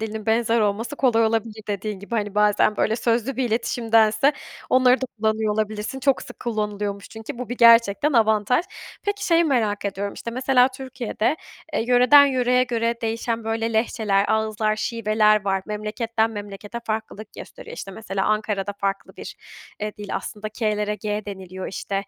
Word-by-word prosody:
dilinin 220 -1 -5
benzer 230 0 +2
olması 215 +7 -1
kolay 230 -4 +3
olabilir 220 -1 -1
dediğin 205 0 -3
gibi. 205 +4 -7
Hani, 205 -2 -2
bazen, 210 0 +3
böyle, 220 - +1
sözlü 235 +2 0
bir 265 - 0
iletişimdense 225 +2 +2 0.4
onları 255 0 +5
da 260 - -1
kullanıyor 220 0 +1
olabilirsin. 215 +4 -3
Çok 275 0 +2
sık - - -12
kullanılıyormuş 210 -3 -3
çünkü 220 +1 -8
bu 250 -2 -5
bir 245 - -4
gerçekten 235 +5 +5
avantaj. 220 - +3 0.4
Peki, 405 0 -2
şeyi 335 0 +4
merak 220 -9 0
ediyorum, 200 0 -3
işte, 235 - -6
mesela 255 +1 +3
Türkiye'de, 260 0 -3 0.4
eee, 300 - 0
yöreden 250 +3 +7
yöreye 250 -1 +2
göre 235 -1 0
değişen, 230 0 -2
böyle, 225 +1 -1
lehçeler, 220 -3 +1
ağızlar, 215 0 0
şiveler 215 -2 +2
var. 195 -1 0
Memleketten 220 +2 -1
memlekete 205 +1 -7
farklılık 215 -1 -5
gösteriyor. - - -10
İşte, 195 - -7
mesela 195 -1 -3
Ankara'da 210 -2 -1
farklı 195 0 -3
bir, - - -9 0.4
eee, 210 0 -3
dil 205 -1 -6
aslında 215 0 -6
k'lere 210 -1 -1
g 210 +1 -3
deniliyor, 190 -2 -7
işte. 195 - -5
220 Hz, 160 wpm, -23 LUFS, 210-235 Hz, 0.4 s, yöreden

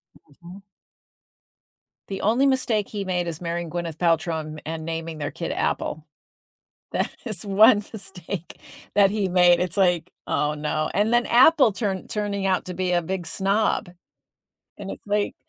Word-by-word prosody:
Mhm. 175 +7 -15 1.5
The 195 - -5
only 235 +6 +3
mistake 250 -6 +1
he 205 -2 -4
made 180 -2 -1
is 165 0 -5
marrying 170 -1 -3
Gwyneth 170 -1 -4
Paltrow 165 -1 +1
and 155 -1 -7
and 160 0 -5
naming 165 -1 -4
their 145 -1 -4
kid - - -4
Apple. 155 0 -2 0.9
That - - 0 0.2
is 215 -6 -3
one 210 +2 +5
mistake 195 -4 -7 0.3
that 200 -1 +5
he 205 -1 -1
made. 180 -1 +5
It's 180 0 -2
like, 180 -3 +2 0.2
"Oh, 150 0 0
no," 155 +1 -2
and 210 +3 +2
then 240 0 +3
Apple 260 0 +6
turn 195 -3 -3
turning 205 -2 -2
out 190 -1 +1
to 180 - -6
be 185 0 -1
a 175 -1 +2
big 180 +1 -4
snob, 195 +2 0 0.9
and - - -7
it's - - -10
like, 205 0 0
185 Hz, 160 wpm, -24 LUFS, 165-205 Hz, 1.5 s, Apple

